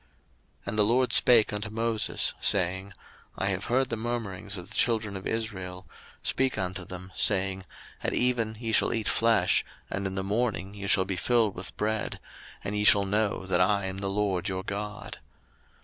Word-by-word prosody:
02:016:011 - - -31
And 105 +1 -2
the - - +7
LORD 125 +4 +2
spake 115 -4 +6
unto 105 +1 -3
Moses, 115 0 +1
saying, 95 -1 +2
02:016:012 100 - -14 0.4
I - - -1
have 95 -1 -1
heard 130 +2 +1
the 115 - -1
murmurings 110 -4 -3
of 90 - -8
the - - -6
children 110 -4 +1
of 95 - -5
Israel: 95 -5 -3 0.4
speak 130 -3 +1
unto 95 -1 -3
them, 90 +1 -9
saying, 95 0 +1 0.4
At - - -1
even 115 -3 0
ye 115 -2 -3
shall 110 - +2
eat 110 -2 -2
flesh, 115 0 +3 0.3
and 100 0 -2
in 95 - -5
the 95 - -2
morning 100 -2 -1
ye 100 -1 -6
shall 95 -1 +4
be 95 -1 -3
filled 115 0 +2
with 90 0 -8
bread; 110 0 -2 0.4
and 100 - -3
ye 105 - 0
shall 100 -1 +5
know 100 -1 0
that 90 -1 +1
I 100 +1 +2
am 95 0 -4
the 100 - -2
LORD 100 -2 0
your 95 0 -3
God. 105 +1 -6
100 Hz, 190 wpm, -27 LUFS, 95-110 Hz, 0.4 s, the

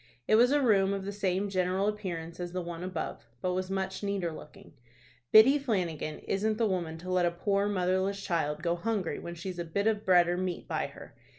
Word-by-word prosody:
It - - +2
was 240 +4 +6
a 290 -1 +3
room 200 -5 +4
of 195 -1 -4
the 200 - -3
same 195 -1 -1
general 185 +1 0
appearance 175 -6 -4
as 175 0 -5
the 185 - -2
one 170 0 -6
above, 180 -9 -5
but 180 +5 -1
was 185 0 -2
much 190 0 -2
neater 200 -4 -1
looking. 155 -1 -12 0.6
"Biddy 260 +7 +8
Flanagan 180 - -2
isn't 215 +2 -1
the 230 - +2
woman 175 -5 -2
to 180 +3 -6
let 180 -1 +3
a - - +3
poor 200 +4 0
motherless 190 0 0
child 160 -5 -1
go 170 0 +1
hungry 200 -1 -2
when 170 0 -7
she's 180 +1 -6
a - - -1
bit 185 +5 -2
of 215 -1 +1
bread 180 -2 +5
or 175 0 0
meat 180 -1 -3
by - - -1
her. - - -13
185 Hz, 215 wpm, -30 LUFS, 175-200 Hz, 0.6 s, Biddy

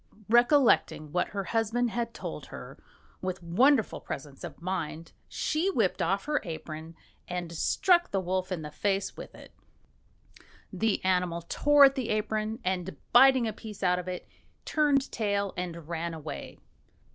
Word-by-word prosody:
Recollecting 240 - +4
what 180 +3 +1
her 195 -1 -4
husband 225 +3 0
had 235 0 -2
told - - -7
her, - - -10 0.4
with 185 -1 -4
wonderful 225 +9 +3
presence 140 0 -7
of - - -8
mind 165 -2 -4 0.2
she 320 +5 0
whipped 225 - +1
off 195 +4 0
her 295 0 0
apron 160 -2 -7 0.3
and 175 -1 -4
struck 345 - +2
the 195 - 0
wolf 185 +1 -2
in 170 -4 -3
the 150 - -7
face 195 +3 -1
with - - -10
it. - - -14 1.2
The 205 +1 0
animal 180 -2 +1
tore 290 +9 +5
at 270 - +4
the 260 -4 -3
apron, 215 +1 -1
and 185 -1 -2 0.2
biting 260 -1 +7
a 220 - -3
piece 210 -2 -9
out 180 0 +3
of 180 - -7
it, 180 -1 -5 0.4
turned 290 -3 +2
tail 200 -3 -1
and 170 -3 -5
ran 170 0 -3
away. 155 - -7
195 Hz, 155 wpm, -29 LUFS, 175-235 Hz, 1.2 s, biting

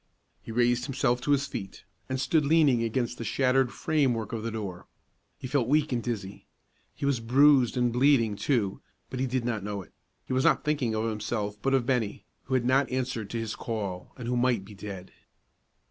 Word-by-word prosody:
He - - -9
raised 120 +1 +2
himself 125 -2 0
to 145 - -1
his 140 -1 +3
feet, 100 -8 -7 0.3
and 130 0 -1
stood 155 +3 +2
leaning 145 -5 +4
against 120 +1 -1
the - - -3
shattered 130 +1 +2
frame 145 -6 +1
work 110 +1 -5
of 115 - -2
the 115 - -3
door. 100 -5 -6 0.5
He - - -9
felt 130 -2 +1
weak 150 +2 +2
and 120 -2 0
dizzy. 100 -5 -5 0.5
He - - -4
was 140 -3 +1
bruised 130 +2 +4
and 120 -1 +2
bleeding, 125 -4 +3
too, 105 -4 0 0.3
but 130 - -4
he 130 - +1
did 125 -1 -1
not 115 -5 -2
know 100 -1 -4
it; - - -22 0.3
he - - -4
was 130 +1 +2
not - - +3
thinking 140 -7 0
of 110 +1 0
himself, 105 -1 -2
but 135 +2 +2
of 130 -3 +1
Bennie, 120 -5 -1 0.2
who 130 - -1
had 125 -2 +1
not 130 +2 +3
answered 125 -5 -2
to 115 - -3
his 115 -1 -3
call, 100 -6 -4
and 120 -2 -6
who 125 - 0
might 120 -5 +1
be 105 - -12
dead. 95 -2 -8
120 Hz, 210 wpm, -28 LUFS, 110-130 Hz, 0.5 s, leaning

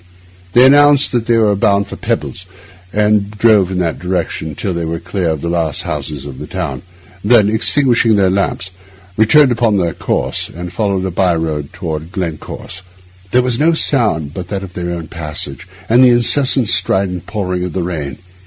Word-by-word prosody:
They 125 +2 +6
announced 145 +1 +5
that 120 -2 -1
they 115 -1 +3
were 105 -2 +3
bound 100 -1 +2
for - - -8
Peebles, 95 - -4 0.4
and 105 0 +2
drove 105 -3 +3
in 95 - -3
that 85 -3 -1
direction 90 -4 -3
till 95 +3 -3
they 85 0 -3
were 80 +1 -3
clear 90 0 -2
of 80 -3 -2
the - - -3
last 85 -1 -1
houses 75 -4 -5
of 70 -3 -8
the - - -7
town; 65 -3 -4 0.4
then, 105 -1 +4
extinguishing 120 0 +3
the 100 -2 +3
lamps, 95 -1 -1 0.4
returned 130 +6 +5
upon 115 -3 +1
their 85 -3 0
course, - - -2
and 90 +1 -8
followed 100 -3 -1
a 95 - -2
by 90 -1 +1
road 80 -3 -3
toward 85 -5 -5
Glencorse. 90 0 -6 0.5
There 125 +4 +3
was 125 -2 -1
no 165 +3 +3
sound 105 - 0
but 90 -1 -6
that 100 -1 -4
of 95 -2 -9
their 90 -1 -4
own 85 -2 -4
passage, 75 0 -7 0.2
and 120 +3 +5
the 125 - +7
incessant, 125 0 +2
strident 95 -2 0
pouring 90 -4 -3
of 90 -3 -4
the 95 - -2
rain. 75 -6 -4
95 Hz, 185 wpm, -15 LUFS, 85-110 Hz, 0.5 s, the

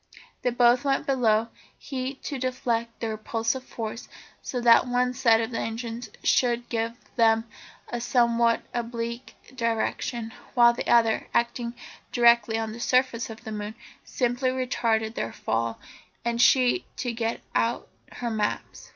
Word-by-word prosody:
They 250 - +1
both 245 +1 +4
went 275 -1 +1
below, 230 -4 +2 0.3
he 265 0 -4
to 275 0 -6
deflect 235 -2 -2
the 225 - -1
repulsive 225 +3 -2
force 230 -2 -6 0.3
so 250 - -3
that 235 +1 +6
one 250 0 +1
set 230 -3 +4
of 230 +1 -3
engines 230 +1 -4
should 240 -1 +2
give 230 0 -1 0.2
them 225 -1 +4 0.4
a 240 - -4
somewhat 235 -1 +2
oblique 235 +1 -4 0.2
direction, 230 -1 -2 0.2
while 235 -1 +7
the - - -5
other, 230 -2 +3
acting 235 0 0 0.4
directly 235 -2 +4
on 225 -1 -2
the 230 - -8
surface 250 -1 +1
of 220 0 -10
the 220 - -6
moon, 210 0 -5 0.3
simply 245 +1 0
retarded 230 -4 0
their 115 - -3
fall; 115 0 -2 0.5
and 235 0 +1
she 255 +6 +4
to 245 -2 -2
get 230 0 -2
out 230 +1 0 0.3
her 240 -1 -3
maps. 215 -1 -3
235 Hz, 140 wpm, -26 LUFS, 225-245 Hz, 0.5 s, while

